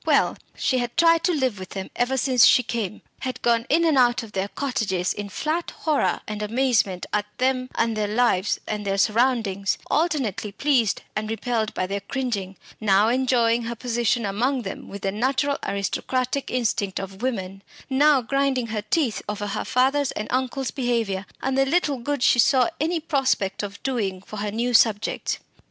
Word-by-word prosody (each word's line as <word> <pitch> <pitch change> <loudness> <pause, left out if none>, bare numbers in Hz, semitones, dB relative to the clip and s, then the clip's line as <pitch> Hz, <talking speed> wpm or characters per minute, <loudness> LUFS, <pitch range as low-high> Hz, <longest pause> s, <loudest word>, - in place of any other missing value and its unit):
Well, - - +3 0.2
she 255 - +1
had 240 +3 -4
tried 330 0 +5
to 360 - +3
live 260 - 0
with 185 - -8
them 190 - -5
ever 250 +2 0
since 255 -2 +4
she 250 - +5
came 215 -3 -4 0.2
had 255 -1 -4
gone 235 +1 +2
in 335 +4 +3
and 305 -5 +4
out 240 0 +3
of 220 - -10
their 195 0 -2
cottages 205 -8 -1
in 205 0 -6
flat 315 - -2
horror 310 -2 0
and 210 0 -4
amazement 215 -4 +1
at 205 0 0
them 255 0 0
and 230 -1 +1
their 210 -1 0
lives 210 -3 +1
and 210 -1 -3
their 195 -1 -1
surroundings; 215 -3 +1
alternately 265 - 0
pleased 250 -3 +1
and 215 0 -2
repelled 225 0 -2
by 185 - 0
their 200 +2 -3
cringing; 200 -4 -3 0.2
now 205 0 +4
enjoying 240 -2 +2
her 235 +1 -4
position 235 0 0
among 240 +6 0
them 195 - -7
with 200 0 -8
the 195 - 0
natural 265 +6 0
aristocratic 250 +7 -2
instinct 210 -6 -1
of 195 +1 -8
women, 195 -6 -3 0.3
now 275 0 +4
grinding 275 0 0
her 210 - -1
teeth 230 +3 0
over 205 0 -3
her 205 - -3
father's 265 +2 +2
and 210 - -4
uncle's 260 +1 -1
behaviour 230 -7 -1 0.2
and 265 0 0
the 270 - +4
little 285 -1 +1
good 285 +1 -2
she 240 - +4
saw 250 +1 +5
any 330 +3 0
prospect 270 - 0
of 200 -1 -6
doing 210 -8 -1
for 215 - -9
her 205 +1 -2
new 235 +4 -1
subjects. 225 -2 +2
235 Hz, 180 wpm, -24 LUFS, 205-265 Hz, 0.3 s, tried